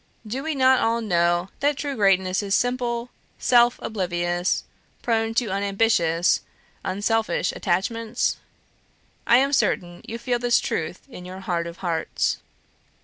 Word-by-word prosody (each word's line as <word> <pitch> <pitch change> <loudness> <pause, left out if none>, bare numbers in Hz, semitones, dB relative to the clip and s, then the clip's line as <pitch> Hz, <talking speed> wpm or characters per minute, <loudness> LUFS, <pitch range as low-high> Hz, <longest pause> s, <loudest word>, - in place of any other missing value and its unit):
Do 240 +5 -4
we 315 +1 -2
not 260 -1 +5
all 230 +1 +1
know 175 -3 +1
that 285 0 +1
true 285 -2 -3
greatness 190 -3 +2
is 200 -1 0
simple, 245 -1 -1 0.3
self 240 0 +4
oblivious, 175 -3 -1 0.4
prone 225 -1 0
to 230 -4 +1
unambitious, 195 -4 +2 0.4
unselfish 205 -2 0
attachments? 225 +6 -1 0.9
I 235 - +7
am 275 +2 +2
certain 175 -8 0
you 230 - -4
feel 245 0 -1
this 240 0 +3
truth 165 +2 -3
in 210 -9 -10
your 185 +1 -8
heart 170 -3 -2
of 170 0 -8
hearts. 165 -2 -1
215 Hz, 135 wpm, -24 LUFS, 180-240 Hz, 0.9 s, I